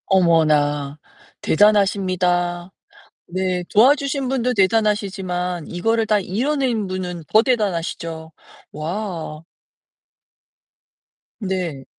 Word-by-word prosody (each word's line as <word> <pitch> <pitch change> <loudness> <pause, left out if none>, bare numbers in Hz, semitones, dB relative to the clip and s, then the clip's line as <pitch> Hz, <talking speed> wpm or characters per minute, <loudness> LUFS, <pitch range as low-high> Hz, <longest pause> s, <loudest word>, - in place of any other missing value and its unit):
어머나, 150 -5 +2 0.4
대단하십니다. 185 -3 +2 0.6
네, 185 0 -2
도와주신 275 +4 +3
분도 250 -1 0
대단하시지만, 190 -5 0
이거를 225 +6 0
다 210 -1 +2
이뤄낸 235 +2 -1
분은 180 -2 -5
더 215 - +6
대단하시죠. 170 -8 -2 0.4
와. 165 -1 -5 2.0
네. 185 - -3
185 Hz, 195 characters per minute, -21 LUFS, 170-215 Hz, 2.0 s, 더